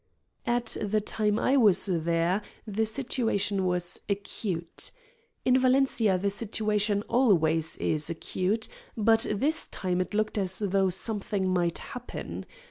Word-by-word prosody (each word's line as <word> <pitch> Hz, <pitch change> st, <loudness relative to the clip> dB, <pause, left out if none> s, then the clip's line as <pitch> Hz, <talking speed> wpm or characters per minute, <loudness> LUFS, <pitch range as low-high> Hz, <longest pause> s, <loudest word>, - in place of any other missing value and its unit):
At 240 Hz, 0 st, +1 dB
the 215 Hz, +1 st, +1 dB
time 210 Hz, 0 st, 0 dB
I 265 Hz, +4 st, +2 dB
was 210 Hz, -7 st, +6 dB
there 170 Hz, +1 st, +1 dB, 0.2 s
the 220 Hz, +1 st, -1 dB
situation 215 Hz, -5 st, 0 dB
was 180 Hz, 0 st, 0 dB
"acute." 195 Hz, -4 st, -3 dB, 0.6 s
In 255 Hz, 0 st, +5 dB
Valencia 255 Hz, -6 st, +3 dB
the 200 Hz, +2 st, 0 dB
situation 210 Hz, -1 st, 0 dB
always 165 Hz, -11 st, +2 dB
is 155 Hz, 0 st, -1 dB
acute, 185 Hz, +6 st, -1 dB, 0.3 s
but 225 Hz, +1 st, +4 dB
this 285 Hz, +10 st, 0 dB
time 185 Hz, -1 st, -1 dB
it 185 Hz, +3 st, -4 dB
looked 215 Hz, 0 st, 0 dB
as 185 Hz, -1 st, -2 dB
though 195 Hz, -2 st, +1 dB
something 200 Hz, 0 st, -1 dB
might 175 Hz, -2 st, +1 dB
happen. 250 Hz, -2 st, -7 dB
205 Hz, 130 wpm, -28 LUFS, 185-225 Hz, 0.6 s, was